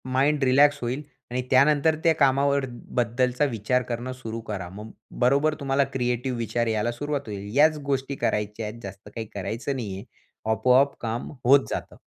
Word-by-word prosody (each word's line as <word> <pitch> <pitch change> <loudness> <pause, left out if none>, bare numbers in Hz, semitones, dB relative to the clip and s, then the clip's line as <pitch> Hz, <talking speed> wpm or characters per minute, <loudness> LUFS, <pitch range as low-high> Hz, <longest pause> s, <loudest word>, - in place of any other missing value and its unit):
Mind 145 +2 +2
relax 140 +3 +5
होईल. 125 +4 -2 0.3
आणि 125 +1 -1
त्यानंतर 145 +4 +4
त्या 165 -2 +5
कामावर 140 0 +3 0.3
बद्दलचा 125 +3 +1
विचार 125 0 0
करणं 120 +2 -3
सुरू 115 -3 -6
करा. 95 -4 -4
मग 105 +2 -8 0.3
बरोबर 140 +5 +3
तुम्हाला 140 -1 +2
क्रिएटिव्ह 125 0 -1
विचार 115 +1 -1
यायला 110 +1 0
सुरुवात 145 +4 -3
होईल. 100 -1 -6
याच 155 +1 +5
गोष्टी 135 +1 -1
करायच्या 105 +1 -1
आहेत 110 +2 -8
जास्त 100 +1 -9
काही 115 -1 -4
करायचं 115 +7 -3
नाहीये. 100 -6 -5 0.5
आपोआप 130 +4 +3
काम 115 +1 -3 0.2
होत 135 +2 +6
जातं. - - -5
125 Hz, 160 wpm, -25 LUFS, 115-140 Hz, 0.5 s, होत